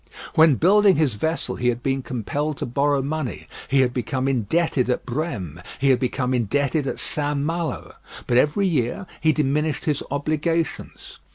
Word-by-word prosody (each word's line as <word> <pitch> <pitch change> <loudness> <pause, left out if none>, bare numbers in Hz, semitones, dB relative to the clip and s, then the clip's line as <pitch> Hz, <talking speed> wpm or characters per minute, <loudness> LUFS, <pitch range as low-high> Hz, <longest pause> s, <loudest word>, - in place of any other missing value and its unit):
When 160 -3 +6
building 195 +5 +5
his 150 -6 +2
vessel 160 +11 -2
he 125 - -1
had 120 0 0
been 135 0 0
compelled 140 +5 -3
to - - -3
borrow 140 +2 +1
money. 150 -1 -4 0.2
He 135 0 +3
had 125 -1 +1
become 130 +2 -2
indebted 130 - +1
at 125 - -1
Brême, 115 - -4
he 135 0 +3
had 130 - +3
become 130 0 -1
indebted 140 +5 0
at - - -3
St. 145 -1 -1
Malo; 165 +3 -3 0.3
but 120 - 0
every 150 +9 +3
year 145 -2 0
he 155 0 +3
diminished 150 0 0
his 150 -3 0
obligations. 155 +3 -2
140 Hz, 165 wpm, -23 LUFS, 125-155 Hz, 0.3 s, When